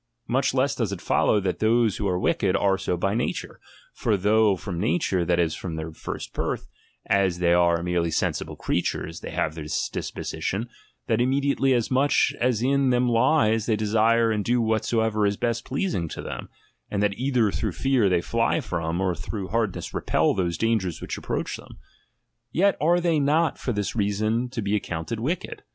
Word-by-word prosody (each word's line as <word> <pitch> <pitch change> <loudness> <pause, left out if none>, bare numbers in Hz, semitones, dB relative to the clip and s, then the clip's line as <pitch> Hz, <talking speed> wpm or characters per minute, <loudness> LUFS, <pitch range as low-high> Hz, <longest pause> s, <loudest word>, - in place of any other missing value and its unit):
Much 135 +2 +1
less 135 +2 +1
does 115 -7 -2
it 100 - -4
follow, 105 - +2
that 95 -2 -2
those 110 -1 +2
who 105 - -1
are 90 -2 0
wicked, 95 +1 +1
are 100 -1 +3
so 95 -2 -2
by 95 +3 0
nature. 120 +3 -3 0.3
For 110 -3 0
though 105 +1 +3
from 90 -2 -5
nature, 100 - +1
that 85 0 +1
is, 85 -2 +1
from 85 -3 -5
their 80 0 -5
first - - -7
birth, - - -3 0.4
as 95 -3 +2
they 85 -1 +3
are 85 -1 +3
merely 85 -1 0
sensible - - -1
creatures, 80 +1 -2
they - - -7
have 75 - -1
this 75 -2 -2
disposition, 110 +5 -4 0.4
that 115 0 +1
immediately 135 +1 +2
as 120 0 -1
much 135 +3 +3
as 120 -2 +1
in 135 0 +2
them 125 0 +2
lies 115 -3 +3
they 110 - +3
desire 110 +2 +2
and 105 -1 0
do 120 +4 +1
whatsoever 110 -1 +1
is 100 0 -1
best 115 -1 -1
pleasing 130 - -1
to - - -7
them, - - -6 0.4
and 100 0 -1
that 105 -1 +2
either 120 -2 +1
through - - -2
fear 130 -7 +2
they 90 -2 +2
fly 115 +5 +1
from, 85 0 -3
or 95 -2 +1
through 95 +2 -5
hardness 110 -4 -2
repel - - +1
those 85 -3 -1
dangers 110 -7 0
which - - -5
approach - - -3
them; - - -14 0.7
yet 195 +4 +3
are 170 +3 +4
they 170 -3 +2
not 155 +3 +2
for 125 - -2
this 105 -1 -2
reason 110 +3 0
to 120 -3 -4
be 100 +1 0
accounted 90 +2 -3
wicked. 180 - -3
110 Hz, 185 wpm, -25 LUFS, 95-125 Hz, 0.7 s, are